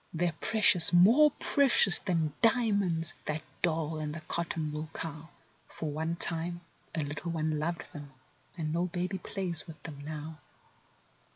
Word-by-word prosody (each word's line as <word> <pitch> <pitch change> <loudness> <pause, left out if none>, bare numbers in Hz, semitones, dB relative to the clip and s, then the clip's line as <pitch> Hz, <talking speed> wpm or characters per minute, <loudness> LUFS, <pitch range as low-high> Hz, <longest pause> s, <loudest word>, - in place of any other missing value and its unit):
They're 170 0 -1
precious; 215 -6 +4
more 225 +13 +6
precious 265 -9 +6
than 165 -6 -1
dia¬ 230 -2 +3
monds, 170 -4 -1
that 155 0 -3 0.2
doll 160 -2 0
and 150 0 -4
the 165 - -7
cotton¬ 160 -1 -3
wool 155 +1 -5
cow. 160 0 -7 0.4
For 155 -2 -6
one 160 +3 -2
time 170 +1 -1 0.3
a 160 - -1
little 145 +4 -5
one 155 -2 -1
loved 170 +2 -4
them—and 135 +1 -9
no 175 +2 0
baby 180 +2 -3
plays 175 -3 -3
with 160 -2 -12
them 145 -3 -8
now. 155 +1 -7
165 Hz, 150 wpm, -30 LUFS, 155-175 Hz, 0.4 s, more